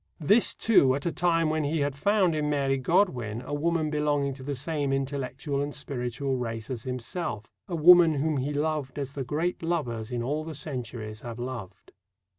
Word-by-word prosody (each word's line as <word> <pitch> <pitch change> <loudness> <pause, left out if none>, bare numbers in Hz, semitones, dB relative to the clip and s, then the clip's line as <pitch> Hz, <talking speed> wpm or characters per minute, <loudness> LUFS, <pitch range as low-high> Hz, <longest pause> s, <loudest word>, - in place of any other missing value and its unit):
This, 205 +9 +4
too, 140 -13 +4
at 140 - -5
a 170 - +1
time 165 -2 +2
when 155 0 0
he 150 +2 0
had 140 -1 -1
found 195 +2 +2
in 150 -1 0
Mary 135 -2 +1
Godwin 125 - +1
a 135 - -6
woman 160 +1 0
belonging 145 -2 0
to 135 - -11
the 140 +2 -3
same 145 0 -2
intellectual 135 +1 -2
and 145 0 -3
spiritual 135 -1 -3
race 115 -1 -4
as 120 -3 -4
himself 125 - -4 0.2
a 180 - -3
woman 170 0 +7
whom 150 +1 0
he 135 +3 -1
loved 150 -2 -2
as 140 -1 -4
the 140 - -3
great 155 +7 -2
lovers 130 -10 -2
in 120 -1 -2
all 150 +5 -1
the 160 -1 -6
centuries 115 -7 -5
have 120 -1 -7
loved. 120 -6 -7
145 Hz, 190 wpm, -27 LUFS, 130-155 Hz, 0.2 s, woman